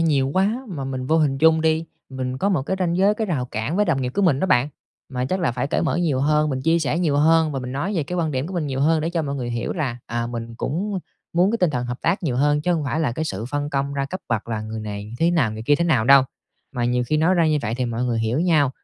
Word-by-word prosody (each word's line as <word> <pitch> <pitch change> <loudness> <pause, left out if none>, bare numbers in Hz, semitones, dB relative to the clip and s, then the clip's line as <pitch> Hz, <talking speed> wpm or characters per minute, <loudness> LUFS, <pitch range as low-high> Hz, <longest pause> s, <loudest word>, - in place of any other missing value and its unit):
nhiều 145 -5 +2
quá 210 +7 +1
mà 145 -8 -5
mình 130 -1 -4
vô 160 - +3
hình 140 -4 +1
chung 160 +1 +5
đi, 160 0 +1 0.2
mình 130 -1 -4
có 200 - +1
một 170 -9 +1
cái 190 - -2
ranh 175 -2 0
giới, 200 +3 +4
cái 220 0 -2
rào 150 -10 -1
cản 110 +10 -2
với 210 - +3
đồng 150 -7 0
nghiệp 125 - -1
của 200 - +1
mình 145 -7 +3
đó 190 - +1
bạn. 125 -4 +3 0.4
Mà 125 -1 -2
chắc 185 +8 -1
là 165 - +1
phải 125 +2 -2
cởi 145 - 0
mở 165 - 0
nhiều 160 -7 +1
hơn, 150 +1 +2
mình 130 -1 -2
chia 165 +2 +3
sẻ 160 +1 0
nhiều 155 -5 +1
hơn 160 +1 +4
và 135 - -2
mình 125 0 -6
nói 175 +10 -2
về 160 - +1
cái 180 +5 -5
quan 165 -3 0
điểm 135 +1 -2
của 185 - -7
mình 165 -4 -1
nhiều 135 -1 -2
hơn 160 +2 +3
để 165 +2 -1
cho 170 -2 -1
mọi 140 -1 -3
người 125 -3 -3
hiểu 115 -1 -2
là, 135 -8 -2
à, 120 0 -2
mình 115 -1 -6
cũng 190 - -2 0.3
muốn 180 +4 +3
cái 230 - -1
tinh 180 -4 +2
thần 125 -4 -2
hợp 125 +1 -5
tác 180 +4 +1
nhiều 130 -7 -1
hơn, 145 +2 +2
chứ 175 +3 +1
hông 160 -4 -1
phải 155 +3 -1
là 145 -7 0
cái 155 +5 -3
sự 110 -5 -4
phân 145 +3 -3
công 140 0 -1
ra 140 - -1
cấp 185 +7 -5
bậc 115 -1 -2
là 110 -2 -2
người 110 +1 -5
này 105 0 -6
thế 165 +1 +3
nào 150 -11 +2
người 110 +1 -6
kia 145 +5 +3
thế 170 - 0
nào 135 -10 +2
đâu. 135 +2 +7 0.5
Mà 120 -2 -1
nhiều 125 0 +1
khi 155 - +1
nói 165 +5 +3
ra 170 -2 +3
như 155 -1 +2
vậy 115 0 -2
thì 125 - -1
mọi 120 +1 -2
người 120 -2 0
hiểu 115 +5 0
nhau, 155 -6 +3
145 Hz, 310 wpm, -22 LUFS, 125-165 Hz, 0.5 s, đâu